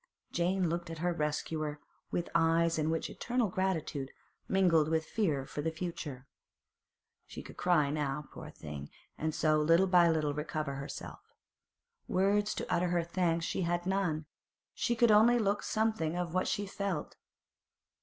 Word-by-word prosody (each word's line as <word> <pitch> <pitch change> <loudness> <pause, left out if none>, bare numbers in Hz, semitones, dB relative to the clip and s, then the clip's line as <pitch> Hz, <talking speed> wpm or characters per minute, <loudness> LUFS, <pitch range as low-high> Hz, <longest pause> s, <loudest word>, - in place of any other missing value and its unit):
Jane 180 +1 +1
looked 170 +1 -2
at 165 - -6
her 175 +2 0
rescuer 150 -1 -2 0.3
with 175 - -2
eyes 165 0 +3
in 155 0 +1
which 160 0 -1
eternal 240 -3 -1
gratitude 165 -7 -1 0.4
mingled 175 -5 +4
with 160 0 +1
fear 155 -10 0
for 145 - -5
the 160 - 0
future. 160 -6 -5 1.0
She - - -8
could - - -11
cry 155 -6 +2
now, 150 -1 -2
poor - - -9
thing, 75 -2 -8 0.3
and 155 0 -2
so 155 -1 +3
little 165 +5 +5
by 180 -2 +5
little 155 -3 +1
recover 150 -1 -3
herself. 140 +1 -7 0.9
Words 205 +3 +2
to - - -3
utter 180 0 +2
her 175 -1 +1
thanks 170 -1 0
she - - -2
had 175 0 0
none; 180 -5 0 0.5
she 240 - 0
could 235 -1 +5
only 225 +3 +6
look 205 -3 +1
something 215 -7 0
of 175 -2 -2
what 185 - +1
she 205 - -1
felt. 195 -5 -3
170 Hz, 155 wpm, -32 LUFS, 155-185 Hz, 1.0 s, only